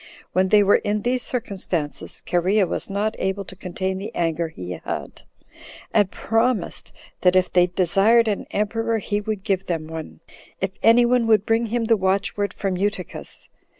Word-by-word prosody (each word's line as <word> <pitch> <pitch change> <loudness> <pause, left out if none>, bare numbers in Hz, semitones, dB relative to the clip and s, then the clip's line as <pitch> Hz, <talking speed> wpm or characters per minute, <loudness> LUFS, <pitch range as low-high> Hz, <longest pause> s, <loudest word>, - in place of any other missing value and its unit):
When 185 +1 +3
they 205 +1 +5
were 200 - +5
in 205 0 -2
these 250 +1 0
circumstances, 190 - -3
Cherea 185 +4 +2
was - - -3
not 205 +2 -1
able 190 +1 -2
to 190 - -11
contain 190 +1 -3
the 200 - -5
anger 165 0 0
he 90 - -8
had, 90 - -6 0.7
and 205 -3 +4
promised, 225 -2 -1 0.3
that 180 0 +4
if 185 0 +2
they 180 0 +5
desired 195 +6 +3
an 205 -2 -2
emperor, 225 +2 0
he 205 0 -2
would 210 -2 -4
give 195 -1 -1
them 165 -3 -2
one, 160 0 -8 0.4
if 190 0 -1
any 235 +2 +6
one 240 -1 +2
would 215 -2 +4
bring 225 +1 +1
him 235 +1 -1
the 225 0 +3
watchword 200 +1 0
from 190 -2 -2
Eutychus. 195 -2 -4
200 Hz, 170 wpm, -23 LUFS, 185-220 Hz, 0.7 s, any